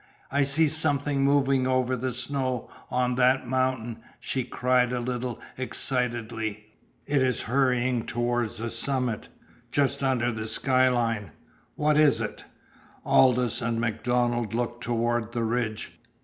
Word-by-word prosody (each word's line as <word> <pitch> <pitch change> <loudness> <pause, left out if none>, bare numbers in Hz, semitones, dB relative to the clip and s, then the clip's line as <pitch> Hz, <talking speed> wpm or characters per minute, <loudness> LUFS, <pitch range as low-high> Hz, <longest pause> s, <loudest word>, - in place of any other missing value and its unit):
"I 140 +1 +2
see 140 +3 +3
something 145 -2 +1
moving 135 -2 +3
over 130 0 +1
the 130 +1 -2
snow 130 0 -2 0.2
on 125 0 +1
that 130 +1 +3
mountain!" 130 -3 -1 0.2
she 130 - -2
cried 125 0 +1
a 125 - -1
little 125 0 -3 0.2
excitedly. 115 -5 -2 0.3
"It 145 -2 +1
is 130 -3 +1
hurrying 125 -1 +1
toward 120 -1 0
the 115 +2 -5
summit 125 -1 -1 0.4
just 140 +1 +1
under 125 -3 +1
the 110 -1 -4
skyline! 120 -4 +1 0.5
What 150 0 +2
is 155 -2 +5
it?" - - -5 0.6
Aldous 125 -2 +3
and 115 0 -1
MacDonald 120 0 0
looked 120 0 -2
toward 120 -1 -1
the 120 -1 -1
ridge. 115 -1 -2
125 Hz, 130 wpm, -26 LUFS, 120-130 Hz, 0.6 s, is